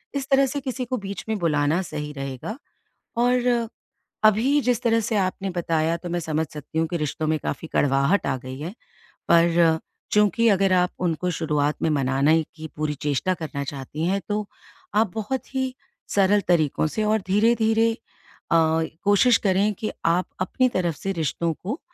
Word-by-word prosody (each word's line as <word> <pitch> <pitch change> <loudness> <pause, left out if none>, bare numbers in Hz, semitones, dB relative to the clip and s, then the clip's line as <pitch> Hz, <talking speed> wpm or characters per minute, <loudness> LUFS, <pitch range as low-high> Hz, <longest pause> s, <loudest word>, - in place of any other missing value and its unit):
इस 275 0 -3
तरह 275 0 +5
से 285 - -3
किसी 260 -1 -3
को 255 +1 -2
बीच 200 -1 -6
में 220 - 0
बुलाना 155 0 +1
सही 150 -4 -5
रहेगा 135 - -5 0.6
और 245 +1 +2 0.8
अभी 230 +7 +4
जिस 245 -2 +1
तरह 230 -1 +3
से 220 +1 -2
आपने 195 0 -1
बताया, 165 -2 0
तो 175 +1 -7
मैं 175 0 -1
समझ 160 -1 -1
सकती 150 +2 -5
हूँ 165 - +1
कि 170 - -2
रिश्तों 155 +1 -2
में 155 0 +2
काफ़ी 165 - -4
कड़वाहट 140 +7 +2
आ 130 - +1
गई 130 +1 -8
है। 170 +7 -5 0.6
पर 165 -1 +4 0.3
चूँकि, 210 +2 +4
अगर 195 -2 +3
आप 180 0 +3
उनको 180 0 0
शुरुआत 150 -3 -1
में 160 - +2
मनाने 140 +3 +2
की 160 0 -7
पूरी 155 -1 -1
चेष्टा 145 +6 -1
करना 150 -4 -5
चाहती 145 +2 -5
हैं, 195 +2 +1
तो 210 0 -1 0.5
आप 210 -3 +2
बहुत 235 +5 -4
ही 260 -1 -1 0.3
सरल 205 +1 +3
तरीकों 155 -3 +2
से 215 +7 -2
और 215 +1 +2
धीरे-धीरे 225 +2 +3 0.6
अ, - - +6 0.5
कोशिश 205 +4 +5
करें 195 +2 +3
कि 220 - -2 0.2
आप 170 +2 +2
अपनी 255 +8 +2
तरफ 175 -7 0
से 195 - -3
रिश्तों 165 0 -1
को 215 - -5
180 Hz, 170 wpm, -24 LUFS, 155-215 Hz, 0.8 s, अ